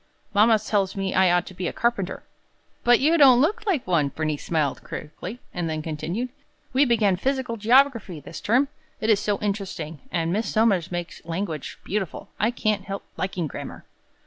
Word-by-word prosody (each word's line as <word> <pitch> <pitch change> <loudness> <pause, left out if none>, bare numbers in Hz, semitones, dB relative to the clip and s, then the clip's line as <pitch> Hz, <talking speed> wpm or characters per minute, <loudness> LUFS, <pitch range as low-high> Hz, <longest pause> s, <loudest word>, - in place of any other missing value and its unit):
Mama 220 +2 +6
tells 200 -2 0
me 195 -1 -2
I 190 -1 +5
ought 175 -1 +2
to - - -10
be 180 -1 -3
a - - -1
carpenter." 205 -6 -1 0.6
"But 240 -1 +6
you 315 +4 +3
don't 260 -4 +8
look 420 - +1
like 340 -11 +1
one," 170 -5 +2
Bernice 155 0 -3
smiled, 155 -5 0
critically; 180 +8 -7 0.2
and 175 -2 -2
then 155 -1 -3
continued: 170 +10 -3 0.4
"We 275 +3 +5
began 215 -7 +3
physical 260 +2 -1
geography 230 - +3
this 150 - -9
term. 250 +6 +3 0.3
It 220 0 +2
is 205 - +4
so 205 -1 0
interesting. 190 -7 -3
And 170 -1 0
Miss 220 +3 -1
Somers 200 -6 +2
makes 175 -1 -5
language 165 -2 -4
beautiful; 195 -3 -3
I 215 - +3
can't 215 -4 -1
help 195 0 -5
liking 185 -3 -2
grammar!" 150 - -7
200 Hz, 175 wpm, -24 LUFS, 175-235 Hz, 0.6 s, don't